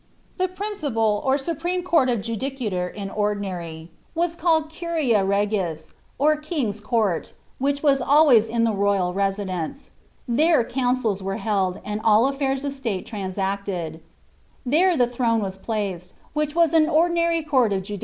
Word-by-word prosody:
* -, -, -36 dB
The 370 Hz, -, +2 dB
principal 295 Hz, -, -1 dB
or 265 Hz, +1 st, +2 dB
supreme 345 Hz, +5 st, -2 dB
court 330 Hz, -7 st, +3 dB
of 235 Hz, -4 st, 0 dB
judicature 230 Hz, -5 st, -3 dB
in 200 Hz, -2 st, -6 dB
ordinarv 185 Hz, -6 st, -3 dB, 0.3 s
wri^ 340 Hz, 0 st, 0 dB
call«j 320 Hz, -2 st, +1 dB
earui 250 Hz, -12 st, +2 dB
regis,* 195 Hz, -6 st, -1 dB, 0.3 s
or 305 Hz, +3 st, +3 dB
King's 295 Hz, -, -3 dB
Court, 215 Hz, -6 st, -1 dB, 0.2 s
which 280 Hz, +2 st, 0 dB
was 275 Hz, -3 st, +3 dB
always 265 Hz, -6 st, +5 dB
at 230 Hz, 0 st, +1 dB
the 230 Hz, -, +2 dB
r<i\Ml 195 Hz, -, -1 dB, 0.4 s
There 300 Hz, +3 st, +3 dB
councils 245 Hz, -5 st, 0 dB
were 195 Hz, +1 st, -3 dB
held, 195 Hz, -4 st, -1 dB
and 210 Hz, +1 st, -3 dB
all 220 Hz, +2 st, +5 dB
affairs 275 Hz, 0 st, -1 dB
of 280 Hz, -, -2 dB
state 230 Hz, -9 st, -3 dB
trnnsaclcil 190 Hz, -5 st, -3 dB, 0.6 s
throne 250 Hz, -7 st, +2 dB
was 190 Hz, -2 st, -4 dB
placed, 195 Hz, -4 st, -4 dB, 0.2 s
wliich 300 Hz, 0 st, -1 dB
was 335 Hz, -2 st, +3 dB
an 320 Hz, -1 st, +4 dB
ordinary 335 Hz, 0 st, +2 dB
court 260 Hz, -7 st, +2 dB
of 190 Hz, -1 st, -1 dB
judi. 205 Hz, +1 st, -6 dB
230 Hz, 145 wpm, -23 LUFS, 200-295 Hz, 0.6 s, always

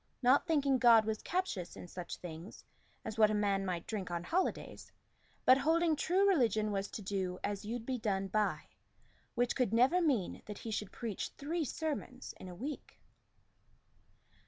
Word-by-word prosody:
Not 255 Hz, +3 st, +4 dB
thinking 280 Hz, -5 st, +2 dB
God 230 Hz, -3 st, +7 dB
was 220 Hz, 0 st, -2 dB
captious 335 Hz, -, -2 dB
in -, -, -9 dB
such 175 Hz, -1 st, -7 dB
things 170 Hz, +2 st, -9 dB, 0.4 s
As 220 Hz, 0 st, -5 dB
what 215 Hz, -1 st, +7 dB
a 215 Hz, -, 0 dB
man 200 Hz, -2 st, +1 dB
might 180 Hz, -3 st, -3 dB
drink 205 Hz, -5 st, -4 dB
on 170 Hz, -1 st, -3 dB
holidays, 360 Hz, -, -2 dB, 0.5 s
But 255 Hz, +1 st, +7 dB
holding 325 Hz, +3 st, +3 dB
true 370 Hz, +6 st, +2 dB
religion 220 Hz, -, +2 dB
was 195 Hz, 0 st, -1 dB
to 240 Hz, -7 st, -7 dB
do 190 Hz, -2 st, -2 dB
As 205 Hz, 0 st, -3 dB
you'd 230 Hz, +1 st, -4 dB
be 255 Hz, -1 st, -2 dB
done 195 Hz, -3 st, -1 dB
by 210 Hz, +1 st, 0 dB, 0.7 s
which 245 Hz, 0 st, +1 dB
could 250 Hz, -6 st, +1 dB
never 265 Hz, +10 st, +4 dB
mean 265 Hz, -, 0 dB
That 210 Hz, -1 st, -6 dB
he 225 Hz, -, -6 dB
should 210 Hz, -2 st, -3 dB
preach 225 Hz, -5 st, -4 dB
three 320 Hz, +4 st, -2 dB
sermons 280 Hz, -3 st, -4 dB
in -, -, -9 dB
a 180 Hz, -, -8 dB
week. 275 Hz, +10 st, -7 dB
220 Hz, 170 wpm, -34 LUFS, 195-280 Hz, 0.7 s, God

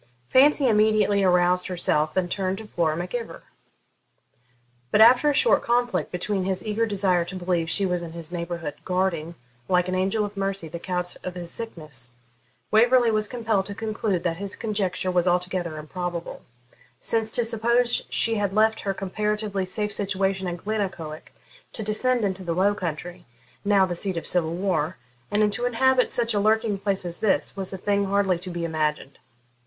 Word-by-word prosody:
Fancy 280 Hz, +1 st, +5 dB
immediately 215 Hz, -2 st, +3 dB
aroused 180 Hz, 0 st, +3 dB
herself 155 Hz, -3 st, 0 dB
and 175 Hz, -2 st, 0 dB
turned 190 Hz, -1 st, -1 dB
to 220 Hz, -, -8 dB
Flora 165 Hz, -6 st, 0 dB
Mac 175 Hz, +1 st, -5 dB
Ivor. 235 Hz, -2 st, -5 dB, 1.5 s
But 210 Hz, -, +2 dB
after 245 Hz, +6 st, +7 dB
a -, -, +2 dB
short 475 Hz, -, +4 dB
conflict 245 Hz, 0 st, 0 dB
between 190 Hz, +2 st, -2 dB
his 190 Hz, +1 st, -2 dB
eager 220 Hz, +2 st, 0 dB
desire 190 Hz, -4 st, +1 dB
to 190 Hz, -, -8 dB
believe 175 Hz, -2 st, -1 dB
she 195 Hz, -, +1 dB
was 180 Hz, -2 st, -1 dB
in 165 Hz, -1 st, -7 dB
his 170 Hz, -1 st, -7 dB
neighbourhood, 170 Hz, -3 st, -4 dB
guarding, 180 Hz, -3 st, -1 dB, 0.3 s
like 180 Hz, -1 st, +3 dB
an 185 Hz, -, -2 dB
angel 195 Hz, +3 st, +1 dB
of 205 Hz, 0 st, -8 dB
mercy, 195 Hz, -3 st, -2 dB
the 170 Hz, +2 st, -7 dB
couch 180 Hz, 0 st, -3 dB
of 180 Hz, -1 st, -5 dB
his 175 Hz, -1 st, -5 dB
sickness, 155 Hz, -, -8 dB, 0.6 s
Waverley 240 Hz, +2 st, +5 dB
was 215 Hz, -1 st, +1 dB
compelled 225 Hz, -5 st, -1 dB
to 200 Hz, -, -5 dB
conclude 215 Hz, -4 st, -2 dB
that 165 Hz, -2 st, -1 dB
his 200 Hz, +1 st, -4 dB
conjecture 195 Hz, -4 st, -2 dB
was 180 Hz, 0 st, +1 dB
altogether 180 Hz, -2 st, 0 dB
improbable; 175 Hz, +2 st, -5 dB, 0.6 s
since, 225 Hz, -1 st, -1 dB
to 240 Hz, -, +2 dB
suppose 235 Hz, +2 st, +2 dB
she 230 Hz, -, +1 dB
had 200 Hz, -2 st, -1 dB
left 220 Hz, +1 st, +3 dB
her 195 Hz, -1 st, -2 dB
comparatively 210 Hz, 0 st, -2 dB
safe 210 Hz, +2 st, -1 dB
situation 195 Hz, -1 st, -1 dB
at 175 Hz, 0 st, -3 dB
Glennaquoich 185 Hz, -8 st, -4 dB, 0.4 s
to 220 Hz, -, -4 dB
descend 230 Hz, +2 st, +1 dB
into 190 Hz, -1 st, -2 dB
the 170 Hz, -2 st, -2 dB
Low 195 Hz, +3 st, +3 dB
Country, 175 Hz, -1 st, -6 dB, 0.4 s
now 200 Hz, -2 st, +4 dB
the 180 Hz, -, -3 dB
seat 185 Hz, +1 st, -2 dB
of 165 Hz, -, -4 dB
civil 170 Hz, -2 st, 0 dB
war, 175 Hz, -3 st, -1 dB, 0.3 s
and 210 Hz, 0 st, +2 dB
to 240 Hz, +4 st, -2 dB
inhabit 260 Hz, +1 st, +2 dB
such 235 Hz, -2 st, +1 dB
a 205 Hz, -, +1 dB
lurking 215 Hz, 0 st, +2 dB
place 195 Hz, -2 st, -1 dB
as 175 Hz, 0 st, -5 dB
this, 210 Hz, -3 st, +1 dB
was 195 Hz, -2 st, -3 dB
a 190 Hz, -, -5 dB
thing 200 Hz, +1 st, 0 dB
hardly 195 Hz, -2 st, +1 dB
to 185 Hz, +1 st, -7 dB
be 175 Hz, -1 st, -3 dB
imagined. 155 Hz, -3 st, -2 dB
190 Hz, 180 wpm, -25 LUFS, 175-215 Hz, 1.5 s, after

